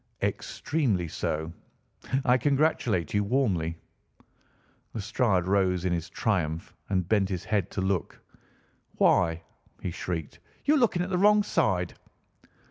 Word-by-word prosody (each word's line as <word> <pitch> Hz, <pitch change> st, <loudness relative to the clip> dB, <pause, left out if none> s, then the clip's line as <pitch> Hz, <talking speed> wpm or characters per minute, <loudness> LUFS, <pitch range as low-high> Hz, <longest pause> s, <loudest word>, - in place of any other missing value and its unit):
"Extremely 120 Hz, -, -1 dB
so. 80 Hz, +1 st, -3 dB, 0.7 s
I 125 Hz, -, +5 dB
congratulate 130 Hz, -, +1 dB
you 105 Hz, 0 st, +2 dB
warmly." 100 Hz, -9 st, 0 dB, 1.2 s
Lestrade 100 Hz, -3 st, +1 dB
rose 95 Hz, -2 st, +1 dB
in 90 Hz, -, +1 dB
his 85 Hz, -1 st, -3 dB
triumph 85 Hz, -5 st, -1 dB, 0.2 s
and 95 Hz, -3 st, 0 dB
bent 100 Hz, -2 st, +2 dB
his 90 Hz, -3 st, -3 dB
head 100 Hz, -3 st, 0 dB
to 95 Hz, -, -3 dB
look. 95 Hz, -4 st, -1 dB, 0.8 s
"Why," 85 Hz, -2 st, +3 dB, 0.4 s
he 90 Hz, -, -4 dB
shrieked, 80 Hz, -3 st, -5 dB, 0.3 s
"you're 300 Hz, +1 st, +4 dB
looking 205 Hz, -8 st, +2 dB
at 185 Hz, -, -5 dB
the 180 Hz, -, +1 dB
wrong 210 Hz, +1 st, +5 dB
side!" 100 Hz, -, +1 dB
95 Hz, 125 wpm, -28 LUFS, 85-125 Hz, 1.2 s, I